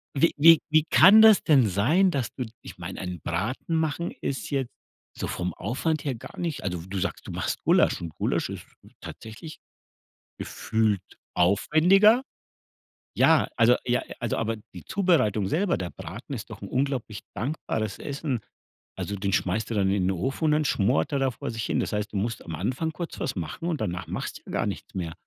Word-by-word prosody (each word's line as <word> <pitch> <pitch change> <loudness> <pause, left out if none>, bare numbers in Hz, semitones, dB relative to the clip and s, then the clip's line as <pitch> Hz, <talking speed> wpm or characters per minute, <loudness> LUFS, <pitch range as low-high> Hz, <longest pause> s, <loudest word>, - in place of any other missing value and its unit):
Wie 165 +5 +4
wie 165 +2 +8
wie 155 0 +4
kann 210 +4 +8
das 220 -2 +7
denn 135 -8 +5
sein, 150 - +3
dass 130 -7 -1
du 125 - -3 0.2
ich - - -11
meine, 90 +1 -6
einen 90 -2 -5
Braten 105 - -2
machen 160 +1 -1
ist 135 - -3
jetzt 135 -3 -1 0.5
so - - -3
vom 90 0 -3
Aufwand 140 - -2
her 135 -3 -1
gar 115 - -11
nicht 170 -4 -3
also, 90 -3 -3
du 95 +1 -5
sagst, - - -4
du - - -6
machst - - -3
Gulasch - - +3
und 85 -2 -5
Gulasch - - -1
ist - - -7 0.4
tatsächlich 110 +9 -9 0.8
gefühlt 110 -4 0 0.3
aufwendiger. 180 - +4 0.9
Ja, - - +4
also 120 +1 +5
ja, 125 0 +1 0.2
also 120 -1 -1
aber 115 0 -1 0.2
die - - -10
Zubereitung 130 - +1
selber, 175 - +1
der 90 -2 -5
Braten 110 - -8
ist 120 0 -7
doch 110 - -10
'n - - -5
unglaublich 130 -5 -2
dankbares 110 -5 -3
Essen. 140 -3 -3 0.6
Also 100 - -3
den 100 0 -2
schmeißt 95 +5 0
du 115 - -2
dann 100 -2 +2
in 100 -1 +1
den 95 - +2
Ofen 135 - -2
und 155 - +4
dann 150 0 +2
schmort 95 - +1
er 140 - +1
da 135 -1 +1
vor 115 - -6
sich 115 0 -4
hin. - - 0
Das - - -2
heißt, 105 0 -2
du - - -1
musst 110 +2 -2
am 85 - -5
Anfang 130 - -2
kurz 165 +2 -6
was 130 - -2
machen 90 - -5
und 160 -4 -2
danach 90 0 -3
machst - - -5
du - - -34
ja - - -8
gar - - 0
nichts - - -6
mehr. 85 -3 -3
120 Hz, 195 wpm, -26 LUFS, 100-155 Hz, 0.9 s, wie